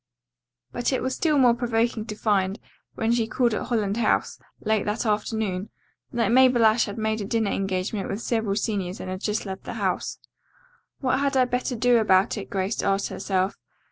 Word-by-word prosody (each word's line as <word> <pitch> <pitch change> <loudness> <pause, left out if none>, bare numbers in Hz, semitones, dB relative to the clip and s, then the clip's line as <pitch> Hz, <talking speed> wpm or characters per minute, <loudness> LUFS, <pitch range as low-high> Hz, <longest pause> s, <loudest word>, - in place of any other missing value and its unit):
But 245 - -1
it 260 - -1
was 260 0 -1
still 305 +1 +1
more 250 -3 +6
provoking 235 -2 0
to 210 - -5
find, 200 -1 0 0.4
when 225 +1 0
she 235 -2 +1
called 240 0 +1
at - - -3
Holland 215 -4 0
House, 235 - +1 0.2
late 220 -1 +1
that 210 +3 -2
afternoon, 210 -2 -1 0.4
that 230 -3 +1
Mabel 250 -2 +5
Ashe 220 +1 +4
had 205 0 -7
made 220 0 -1
a - - -3
dinner 220 0 0
engagement 195 +1 -2
with 200 - -3
several 225 -4 -1
seniors 195 -4 -2
and 185 - -5
had 185 +1 -5
just 210 0 -1
left 190 -1 -6
the - - -5
house. - - -2 0.8
"What 260 -1 +1
had 280 -1 +1
I 255 - +5
better 250 +1 -2
do 240 +1 +4
about 190 -2 +3
it?" 205 - -6
Grace 195 +2 -1
asked 195 0 0
herself. 190 0 -1
220 Hz, 190 wpm, -25 LUFS, 200-240 Hz, 0.8 s, more